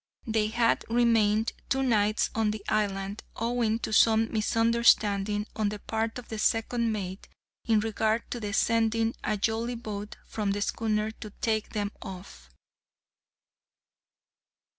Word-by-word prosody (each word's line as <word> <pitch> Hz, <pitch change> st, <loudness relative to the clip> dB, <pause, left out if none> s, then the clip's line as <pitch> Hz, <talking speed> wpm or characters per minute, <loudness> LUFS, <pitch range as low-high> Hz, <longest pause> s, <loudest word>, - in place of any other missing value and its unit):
They 220 Hz, -2 st, +1 dB
had 230 Hz, +1 st, +2 dB
remained 225 Hz, -2 st, +3 dB, 0.2 s
two 270 Hz, 0 st, +1 dB
nights 215 Hz, -4 st, +2 dB
on 220 Hz, -1 st, +1 dB
the 210 Hz, -1 st, -5 dB
island, 200 Hz, -1 st, -1 dB
owing 230 Hz, -1 st, 0 dB
to 215 Hz, -, -5 dB
some 225 Hz, 0 st, +4 dB
misunderstanding, 215 Hz, -2 st, +3 dB
on 215 Hz, -2 st, +1 dB
the 210 Hz, -, -5 dB
part 225 Hz, +2 st, -2 dB
of 250 Hz, -, -9 dB
the 220 Hz, -, -5 dB
second 230 Hz, +1 st, +1 dB
mate, 190 Hz, -3 st, -5 dB, 0.4 s
in 220 Hz, -2 st, +3 dB
regard 220 Hz, +1 st, 0 dB
to 240 Hz, -, -3 dB
the 210 Hz, -2 st, -4 dB
sending 225 Hz, +1 st, +2 dB
a 215 Hz, -, 0 dB
jollyboat 220 Hz, -1 st, -3 dB
from 205 Hz, -2 st, -2 dB
the 205 Hz, -, -3 dB
schooner 215 Hz, -1 st, -1 dB
to 220 Hz, -1 st, -10 dB
take 220 Hz, -2 st, -1 dB
them 205 Hz, -2 st, -1 dB
off. 180 Hz, -, -10 dB
220 Hz, 135 wpm, -28 LUFS, 210-230 Hz, 0.4 s, some